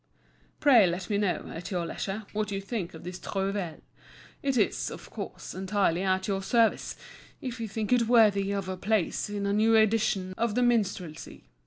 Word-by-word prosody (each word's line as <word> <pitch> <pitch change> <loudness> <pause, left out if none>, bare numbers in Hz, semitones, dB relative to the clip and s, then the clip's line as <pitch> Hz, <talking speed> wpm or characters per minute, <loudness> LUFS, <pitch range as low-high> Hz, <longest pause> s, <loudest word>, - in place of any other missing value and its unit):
Pray 245 -9 +6
let 175 +3 -3
me 200 - +2
know, 205 -4 0
at 165 - -6
your 180 -3 -1
leisure, 200 +5 -4
what 210 0 -1
you 195 -1 -2
think 195 -4 -4
of 160 - -11
this 180 +1 -6
trouvaille. 195 -4 -3 0.6
It 275 -2 0
is, 210 - +1
of - - -10
course, - - -7
entirely 190 -2 0
at 190 0 +1
your 195 -1 -1
service, 230 +3 +2 0.4
if 250 -2 -5
you 225 - -3
think 215 +2 -1
it 235 -2 +3
worthy 210 -4 +4
of 200 -2 -2
a 185 0 -4
place 210 0 0
in 205 -1 -3
a 200 - +1
new 220 +2 +4
edition 210 -4 +2
of 230 -2 0
the 250 - +3
"Minstrelsy." 200 -9 -1
200 Hz, 185 wpm, -28 LUFS, 185-220 Hz, 0.6 s, Pray